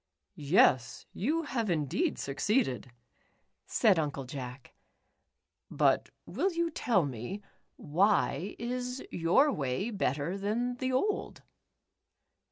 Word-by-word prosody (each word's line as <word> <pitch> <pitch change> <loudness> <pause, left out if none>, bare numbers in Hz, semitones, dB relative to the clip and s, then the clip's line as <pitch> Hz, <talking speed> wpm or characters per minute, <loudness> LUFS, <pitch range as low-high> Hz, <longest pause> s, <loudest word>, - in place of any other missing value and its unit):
"Yes, 140 - +3
you 310 - 0
have 235 -7 -2
indeed 170 - 0
succeeded," 140 - 0 0.8
said 205 -7 +3
Uncle 145 -3 -2
Jack, 125 -1 -8 1.0
"but - - +2 0.2
will 385 - -1
you 335 -1 -1
tell 220 - +1
me, 135 - -6 0.3
why 165 0 +1
is 250 +2 -4
your 175 - +3
way 140 - -2
better 170 - -1
than 240 +5 -1
the 260 +1 -1
old 400 +12 -1
195 Hz, 100 wpm, -30 LUFS, -, 1.0 s, Yes